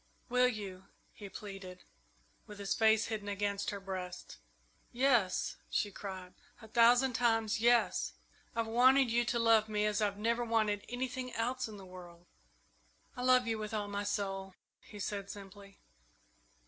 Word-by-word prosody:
"Will 250 Hz, +1 st, +4 dB
you?" 195 Hz, -5 st, -5 dB, 0.3 s
he 205 Hz, -2 st, -9 dB
pleaded, 195 Hz, -3 st, -9 dB, 0.6 s
with 210 Hz, -, -10 dB
his 200 Hz, -1 st, -1 dB
face 220 Hz, 0 st, +4 dB
hidden 215 Hz, -2 st, -4 dB
against 200 Hz, 0 st, -1 dB
her 200 Hz, -, -4 dB
breast. 185 Hz, -2 st, -7 dB, 0.5 s
"Yes," 245 Hz, -6 st, +2 dB
she 205 Hz, -, 0 dB
cried, 185 Hz, -2 st, -7 dB, 0.3 s
"a 220 Hz, -, -12 dB
thousand 240 Hz, +3 st, +5 dB
times, 225 Hz, -2 st, +1 dB
yes! 240 Hz, 0 st, +3 dB, 0.4 s
I've 230 Hz, 0 st, 0 dB
wanted 250 Hz, +3 st, +5 dB
you 240 Hz, +1 st, +3 dB
to 240 Hz, -, 0 dB
love 225 Hz, -2 st, +4 dB
me 210 Hz, 0 st, +1 dB
as 210 Hz, 0 st, 0 dB
I've 200 Hz, -1 st, 0 dB
never 230 Hz, +3 st, 0 dB
wanted 215 Hz, -3 st, +1 dB
anything 255 Hz, +1 st, -3 dB
else 250 Hz, +3 st, -1 dB
in 215 Hz, -2 st, -9 dB
the 195 Hz, -, -11 dB
world!" 175 Hz, -2 st, -12 dB, 0.9 s
"I 250 Hz, -, -5 dB
love 255 Hz, 0 st, +4 dB
you 225 Hz, -1 st, -1 dB
with 215 Hz, 0 st, -4 dB
all 205 Hz, -1 st, -2 dB
my 205 Hz, 0 st, -3 dB
soul," 195 Hz, -2 st, -3 dB, 0.2 s
he 210 Hz, -, -12 dB
said 200 Hz, 0 st, -4 dB
simply. 200 Hz, 0 st, -11 dB
210 Hz, 155 wpm, -33 LUFS, 200-235 Hz, 0.9 s, thousand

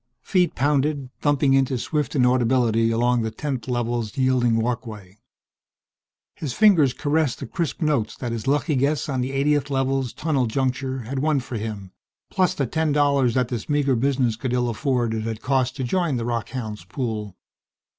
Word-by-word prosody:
Feet 180 Hz, -2 st, +1 dB
pounded, 140 Hz, 0 st, 0 dB
thumping 145 Hz, -2 st, +2 dB
into 135 Hz, -1 st, +2 dB
swift 150 Hz, +3 st, -2 dB
inaudibility 125 Hz, -3 st, +3 dB
along 120 Hz, +1 st, +2 dB
the 110 Hz, -, -1 dB
10th 130 Hz, -1 st, -4 dB
Level's 120 Hz, -2 st, -2 dB
yielding 130 Hz, -3 st, +2 dB
walkway. 110 Hz, -4 st, -4 dB, 1.2 s
His 140 Hz, -6 st, -4 dB
fingers 180 Hz, -, +5 dB
caressed 145 Hz, 0 st, 0 dB
the 140 Hz, -, -6 dB
crisp 165 Hz, +5 st, -3 dB
notes 140 Hz, -8 st, 0 dB
that 120 Hz, -2 st, -4 dB
his 115 Hz, +2 st, -4 dB
lucky 145 Hz, +2 st, +1 dB
guess 140 Hz, +4 st, +1 dB
on 130 Hz, -3 st, -1 dB
the 125 Hz, -, -2 dB
80th 145 Hz, +1 st, +1 dB
Level's 135 Hz, -2 st, 0 dB
tunnel 140 Hz, -6 st, 0 dB
juncture 130 Hz, +2 st, -1 dB
had 130 Hz, +4 st, -4 dB
won 150 Hz, 0 st, +2 dB
for 125 Hz, -2 st, -6 dB
him, 105 Hz, -3 st, -6 dB, 0.4 s
plus 185 Hz, -2 st, +1 dB
the 140 Hz, -, 0 dB
ten 160 Hz, +4 st, 0 dB
dollars, 140 Hz, -4 st, +2 dB
that 125 Hz, -2 st, +1 dB
this 120 Hz, 0 st, -5 dB
meager 145 Hz, -3 st, +2 dB
business 125 Hz, -2 st, +1 dB
could 120 Hz, +2 st, -3 dB
ill 125 Hz, -1 st, +1 dB
afford, 120 Hz, -1 st, 0 dB
it 110 Hz, -, -2 dB
had 110 Hz, 0 st, -4 dB
cost 130 Hz, -1 st, +1 dB
to 135 Hz, -, -3 dB
join 170 Hz, +3 st, 0 dB
the 115 Hz, -, -3 dB
rockhounds' 115 Hz, -2 st, -4 dB
pool.... 110 Hz, -7 st, -4 dB
130 Hz, 170 wpm, -23 LUFS, 115-140 Hz, 1.2 s, fingers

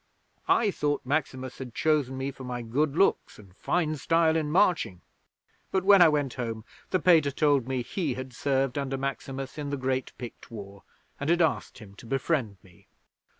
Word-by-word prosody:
I 220 Hz, -3 st, +3 dB
thought 145 Hz, -6 st, -1 dB
Maximus 130 Hz, -2 st, -2 dB
had 125 Hz, -3 st, -8 dB
chosen 145 Hz, -4 st, +1 dB
me 135 Hz, +1 st, -2 dB
for 135 Hz, -, -11 dB
my 125 Hz, -1 st, -4 dB
good 140 Hz, +6 st, 0 dB
looks 195 Hz, -, +2 dB
and 95 Hz, -3 st, -16 dB
fine 155 Hz, -, 0 dB
style 165 Hz, +2 st, +2 dB
in 155 Hz, -2 st, 0 dB
marching, 160 Hz, -, +2 dB, 0.7 s
but, 190 Hz, -1 st, 0 dB
when 200 Hz, -1 st, +7 dB
I 170 Hz, -, +8 dB
went 145 Hz, -4 st, 0 dB
home, 115 Hz, -3 st, -4 dB, 0.2 s
the 185 Hz, -, +1 dB
Pater 160 Hz, -4 st, +5 dB
told 140 Hz, -3 st, +2 dB
me 130 Hz, -2 st, -1 dB
he 145 Hz, +1 st, -2 dB
had 130 Hz, 0 st, -7 dB
served 135 Hz, +1 st, 0 dB
under 135 Hz, -1 st, -2 dB
Maximus 135 Hz, +1 st, -5 dB
in 145 Hz, -1 st, -4 dB
the 140 Hz, -, -2 dB
great 130 Hz, -1 st, -1 dB
Pict 120 Hz, -2 st, -9 dB
War, 100 Hz, -3 st, -9 dB, 0.4 s
and 140 Hz, -, -2 dB
had 170 Hz, 0 st, +4 dB
asked 160 Hz, -, -1 dB
him 105 Hz, -3 st, -12 dB
to 115 Hz, -, -12 dB
befriend 130 Hz, -5 st, -1 dB
me.' 90 Hz, -2 st, -21 dB
135 Hz, 185 wpm, -27 LUFS, 125-155 Hz, 0.7 s, I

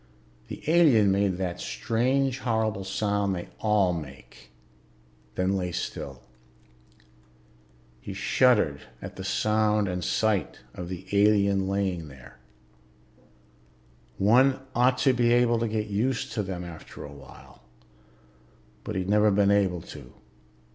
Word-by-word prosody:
The -, -, -9 dB
alien 145 Hz, -, +5 dB
made 100 Hz, -2 st, +1 dB
that 90 Hz, -2 st, -4 dB
strange 125 Hz, -, 0 dB
horrible 110 Hz, -4 st, -1 dB
sound 100 Hz, 0 st, -1 dB
they 85 Hz, -, -7 dB
all 105 Hz, -4 st, +2 dB
make, 75 Hz, -5 st, -10 dB, 0.9 s
then 95 Hz, +1 st, 0 dB
lay 90 Hz, -2 st, -2 dB
still. 70 Hz, -6 st, -6 dB, 1.8 s
He 95 Hz, +9 st, -8 dB
shuddered 105 Hz, -, +2 dB, 0.2 s
at -, -, -9 dB
the -, -, -7 dB
sound 105 Hz, -1 st, +1 dB
and 90 Hz, -1 st, -3 dB
sight 110 Hz, 0 st, 0 dB, 0.2 s
of 90 Hz, -1 st, -7 dB
the 95 Hz, 0 st, -7 dB
alien 100 Hz, -1 st, +3 dB
lying 95 Hz, -4 st, -2 dB
there. 65 Hz, -2 st, -15 dB, 1.8 s
One 130 Hz, +7 st, +4 dB
ought 125 Hz, +1 st, +3 dB
to 135 Hz, -, +5 dB
be 120 Hz, -1 st, +2 dB
able 120 Hz, -1 st, +3 dB
to 115 Hz, -, 0 dB
get 110 Hz, -1 st, -2 dB
used 120 Hz, +6 st, -1 dB
to 110 Hz, -, -2 dB
them 95 Hz, -3 st, -5 dB
after 85 Hz, -2 st, -10 dB
a 70 Hz, -, -9 dB
while, 70 Hz, -3 st, -15 dB, 1.2 s
but 105 Hz, -, -5 dB
he'd 95 Hz, -1 st, -2 dB
never 105 Hz, +1 st, +4 dB
been 100 Hz, 0 st, +3 dB
able 95 Hz, -4 st, +1 dB
to. -, -, -12 dB
100 Hz, 125 wpm, -26 LUFS, 90-110 Hz, 1.8 s, alien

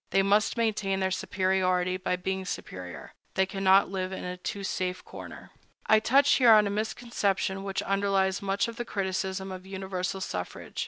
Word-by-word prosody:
They 195 Hz, -, +3 dB
must 205 Hz, +4 st, +2 dB
maintain 210 Hz, -4 st, 0 dB
their 190 Hz, 0 st, 0 dB
superiority 185 Hz, -1 st, +1 dB
by 185 Hz, 0 st, -1 dB
being 190 Hz, +1 st, -3 dB
superior. 90 Hz, -, -7 dB, 0.2 s
They 190 Hz, -, +3 dB
cannot 195 Hz, 0 st, +3 dB
live 185 Hz, -1 st, -2 dB
in 190 Hz, -, -5 dB
a 180 Hz, 0 st, -4 dB
too 195 Hz, +2 st, -5 dB
safe 185 Hz, -1 st, -3 dB
corner.I 215 Hz, -, -2 dB
touch 270 Hz, +6 st, +4 dB
here 240 Hz, -4 st, +7 dB
on 210 Hz, -1 st, +6 dB
a 200 Hz, -, -1 dB
misconception 200 Hz, -3 st, -1 dB
which 195 Hz, -1 st, -2 dB
underlies 195 Hz, -1 st, +1 dB
much 200 Hz, +1 st, 0 dB
of 230 Hz, 0 st, -7 dB
the 240 Hz, -, -3 dB
criticism 190 Hz, -1 st, -2 dB
of 185 Hz, 0 st, -8 dB
universal 190 Hz, -1 st, -3 dB
suffrage. 90 Hz, -, -5 dB
190 Hz, 165 wpm, -28 LUFS, 185-200 Hz, 0.2 s, here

